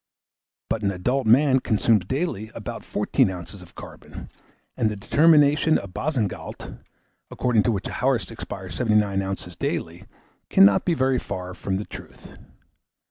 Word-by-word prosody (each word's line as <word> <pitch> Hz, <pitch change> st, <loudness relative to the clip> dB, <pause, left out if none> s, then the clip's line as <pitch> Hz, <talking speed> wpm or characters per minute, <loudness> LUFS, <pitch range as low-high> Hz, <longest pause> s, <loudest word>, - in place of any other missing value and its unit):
But 110 Hz, -, -2 dB
an 100 Hz, -, +1 dB
adult 115 Hz, +7 st, -1 dB
man 130 Hz, +3 st, +5 dB
consumes 110 Hz, -4 st, +1 dB
daily 130 Hz, -, -3 dB
abut -, -, -7 dB
14 -, -, +1 dB
oz. 90 Hz, +1 st, -8 dB
of 90 Hz, -, -16 dB
carbon, -, -, -11 dB, 0.4 s
and 110 Hz, -, +1 dB
the 105 Hz, -, -4 dB
determination 150 Hz, +6 st, +4 dB
of 100 Hz, -2 st, -8 dB
Boussingault, 120 Hz, -, -3 dB, 0.5 s
according 120 Hz, -4 st, +1 dB
to 120 Hz, -, +1 dB
which 100 Hz, -3 st, -3 dB
a -, -, -6 dB
horse 120 Hz, -7 st, 0 dB
expires 95 Hz, -2 st, -8 dB
79 105 Hz, -4 st, +1 dB
oz. 95 Hz, -2 st, -5 dB
daily, -, -, -4 dB, 0.4 s
cannot 95 Hz, 0 st, +5 dB
be 175 Hz, -, +1 dB
very 130 Hz, -2 st, +1 dB
far 90 Hz, 0 st, -6 dB
from 95 Hz, 0 st, -3 dB
the 105 Hz, -, -5 dB
truth. -, -, -12 dB
105 Hz, 145 wpm, -24 LUFS, 95-130 Hz, 0.5 s, man